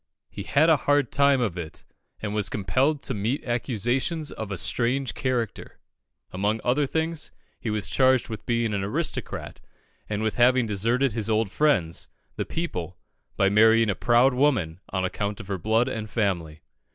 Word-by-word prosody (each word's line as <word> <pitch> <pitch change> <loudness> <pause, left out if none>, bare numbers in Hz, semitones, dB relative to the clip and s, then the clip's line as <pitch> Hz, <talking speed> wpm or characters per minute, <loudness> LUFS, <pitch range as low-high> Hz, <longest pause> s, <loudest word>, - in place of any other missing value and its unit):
"He 100 - -7
had 140 +10 +3
a 160 -2 +5
hard 145 +1 +1
time 140 -2 +3
of 95 -7 -1
it, 80 -3 -8 0.4
and 105 -1 -3
was 105 -1 +1
compelled 130 - 0
to 135 - -2
meet 115 +8 -2
accusations 125 - -1
of 110 -2 -6
a 95 - -4
strange 125 +7 0
character. 120 -5 -3 0.5
Among 105 +4 -1
other 135 +4 +1
things, 160 +1 -2 0.3
he 115 - -4
was 105 -2 -1
charged 130 +1 +3
with 110 -2 -8
being 115 -2 0
an 100 -1 -1
aristocrat, 100 - -4 0.5
and 105 0 -2
with 110 - -1
having 125 0 +4
deserted 115 +5 +1
his 110 -1 -1
old 110 -2 +1
friends, 100 - +1 0.3
the - - -3
people, 95 - -4 0.4
by 95 - +3
marrying 110 +1 +5
a - - 0
proud 120 +5 +4
woman 125 - +1
on 95 -1 -1
account 100 +3 -3
of 105 -3 -10
her 95 -2 -2
blood 110 +6 +2
and 110 -4 -4
family. 85 -9 -2
115 Hz, 170 wpm, -25 LUFS, 100-130 Hz, 0.5 s, a